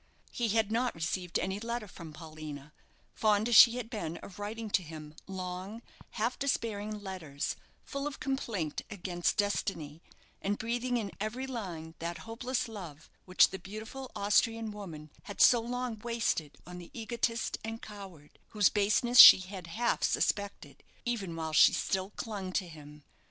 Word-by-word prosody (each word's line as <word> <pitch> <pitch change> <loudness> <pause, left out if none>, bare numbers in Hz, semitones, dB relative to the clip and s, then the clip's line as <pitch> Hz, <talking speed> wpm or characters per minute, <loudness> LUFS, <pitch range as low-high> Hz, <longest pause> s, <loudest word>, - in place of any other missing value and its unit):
He 240 - -1
had 220 0 +1
not 245 +2 0
received 175 +2 -2
any 190 +1 -2
letter 235 0 -4
from 170 -3 -10
Paulina, 155 -2 -9 0.4
fond 215 0 +2
as 240 - +2
she 235 +3 +10
had 245 -3 -4
been 170 -9 -4
of 195 0 -11
writing 215 +1 -5
to 190 - +3
him 155 -2 -9
long, 190 +4 -6 0.3
half 235 +3 -1
despairing 215 -6 -2
letters, 160 -7 -4 0.3
full 280 0 -4
of 295 - -6
complaint 225 - -2
against 175 -3 -2
destiny, 170 -7 -1 0.4
and 205 +1 -1
breathing 240 +2 -1
in 205 -4 -3
every 215 +6 -3
line 180 -11 -6
that 170 +1 -4
hopeless 245 +3 -2
love 175 -9 -9
which 185 0 +5
the 190 - -5
beautiful 220 +8 -8
Austrian 220 +2 +2
woman 165 -8 -9
had 205 - -8
so 240 -2 +7
long 245 -1 -3
wasted 230 -10 -1
on 180 0 -9
the 175 - -11
egotist 230 +1 -1
and 225 +1 -6
coward, 190 -8 -11
whose 210 -3 +3
baseness 215 +4 +3
she - - +13
had 185 -1 -8
half 235 +8 0
suspected 200 -1 -1 0.2
even 205 -8 -2
while 160 -1 -4
she - - +7
still 190 0 -1
clung 200 -4 -5
to 185 -2 0
him. 150 -2 -12
205 Hz, 155 wpm, -31 LUFS, 175-230 Hz, 0.4 s, she